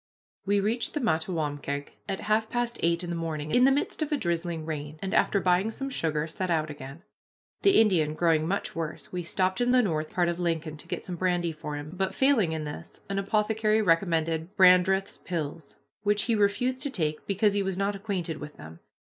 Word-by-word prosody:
We 200 0 +3
reached 225 +8 -1
the - - +1
Mattawamkeag 155 - -1 0.2
at 195 - -2
half 220 +1 +1
past 240 0 -2
eight 170 +1 +1
in 175 - -4
the - - -2
morning, 155 -2 -3
in 250 +1 +5
the 270 - +6
midst 285 +3 -1
of 310 0 -1
a 295 - +2
drizzling 170 - -2
rain, 150 -1 -5
and, 190 +2 -4
after 200 - +3
buying 185 +3 +2
some 270 +4 -5
sugar, 155 -8 0
set 185 +3 -4
out 155 -2 0
again. 145 +3 -10 0.6
The 395 - +5
Indian 170 -9 +3
growing 160 -2 +2
much 200 +3 -2
worse, 160 -2 -5
we 180 - -3
stopped 185 +4 0
in 245 - +2
the 250 0 +5
north 155 -6 -1
part 180 -5 +1
of 170 0 -2
Lincoln 165 -3 -1
to - - -13
get - - -4
some 180 -2 -5
brandy 175 -1 +1
for 155 -1 -6
him, 145 +1 -6
but, 190 +1 -2
failing 265 - +3
in 160 -1 -3
this, 150 0 -8
an 195 0 -1
apothecary 215 +2 +1
recommended 165 -1 +1
Brandreth's 190 +1 +5
pills, 160 -3 -5 0.3
which 205 0 +2
he 235 - +1
refused 245 +5 +1
to 285 - +2
take 155 - -2
because 200 +1 +2
he 200 - +1
was 190 -2 -2
not 200 +1 0
acquainted 190 -6 -3
with 150 0 -9
them. 80 +2 -11
180 Hz, 205 wpm, -28 LUFS, 160-205 Hz, 0.6 s, the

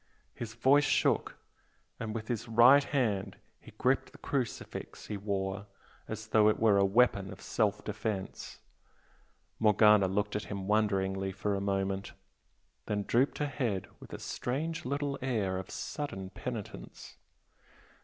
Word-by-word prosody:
His 115 -1 -7
voice 135 +5 +5
shook - - +1 0.6
and 110 -1 -4
with 110 -1 -4
his 120 0 -3
right 120 +5 +7
hand 115 -10 -1 0.2
he - - -15
gripped - - +1
the - - -15
crucifix 130 -5 -4
he 105 - -4
wore 100 0 -3 0.4
as 110 0 -6
though 110 -1 +5
it 110 - 0
were 105 -3 +5
a - - +5
weapon 100 -2 +3
of - - -10
self 105 -2 0
defence. 105 -2 -4 1.0
Morgana 105 -2 +6
looked 105 +2 -1
at 105 - -2
him 100 -2 -5
wonderingly 95 -2 +1
for 100 +2 -2
a 100 - -1
moment, 95 0 -1 0.7
then 105 -1 -1
drooped 125 +7 +2
her 150 - 0
head 120 -10 -2
with - - -13
a - - -5
strange 155 +6 -3
little 140 +1 -2
air 105 -8 0
of 95 - -8
sudden 95 -11 -5
penitence. 110 0 -7
105 Hz, 145 wpm, -31 LUFS, 100-120 Hz, 1.0 s, right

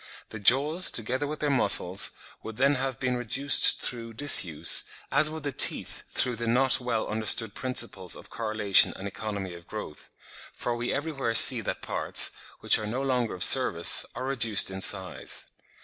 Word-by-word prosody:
The 110 - -9
jaws, 145 - +3
together 125 +5 -2
with 150 +1 -7
their 145 -1 -1
muscles, 100 -7 +1 0.3
would 110 -1 -10
then 140 +3 +2
have 130 -2 -4
been 125 -1 -2
reduced 130 +4 +3
through 115 -2 -4
disuse, 90 - +4 0.3
as 155 - +2
would 155 -1 -9
the 145 - -4
teeth - - +1
through 125 -2 -3
the 120 +1 -5
not 130 +3 +2
well 120 -3 -4
understood 110 0 0
principles 115 -8 -2
of - - -15
correlation 110 -3 +2
and 95 - -8
economy 100 -2 -7
of 85 0 -14
growth; - - -9 0.4
for 120 - -5
we 120 +1 -4
everywhere 140 -5 -4
see - - +6
that - - -6
parts, - - -1 0.3
which - - +3
are 105 - -6
no 125 +5 -4
longer 125 -6 -2
of 90 - -1
service, - - +3
are 130 - -6
reduced 115 -7 +1
in 95 0 -7
size. 95 -1 -1
120 Hz, 170 wpm, -25 LUFS, 105-135 Hz, 0.4 s, see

